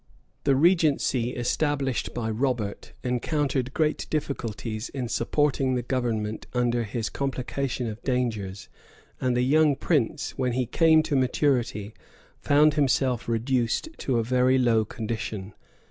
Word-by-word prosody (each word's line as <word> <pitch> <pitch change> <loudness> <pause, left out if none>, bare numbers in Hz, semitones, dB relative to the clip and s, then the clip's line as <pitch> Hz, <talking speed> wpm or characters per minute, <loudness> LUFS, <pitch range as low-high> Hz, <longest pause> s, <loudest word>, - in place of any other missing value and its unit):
[] - - -43
The 140 -1 +4
regency 145 -6 +2
established 135 +1 -1
by 110 -2 -3
Robert 115 -3 -2
encountered 130 +1 -1
great 155 +1 0
difficulties 115 -6 -3
in 130 -3 -4
supporting 135 +1 +1
the 125 - -1
government 115 -4 -2
under 120 -1 +1
his 110 +1 -3
complication 135 -1 -3
of 110 0 -6
dangers; 110 -7 -2 0.5
and 125 -1 +1
the 125 - +2
young 150 +2 +4
prince, 150 -1 0
when 125 -2 +1
he 125 +1 0
came 160 +5 +4
to 145 - -1
maturity, 125 -5 0 0.5
found 150 +1 +4
himself 130 -4 +1
reduced 120 - 0
to 130 -3 0
a 115 - +1
very 125 +2 +3
low 115 -3 +3
condition. 110 -3 -5
125 Hz, 130 wpm, -26 LUFS, 115-140 Hz, 0.5 s, The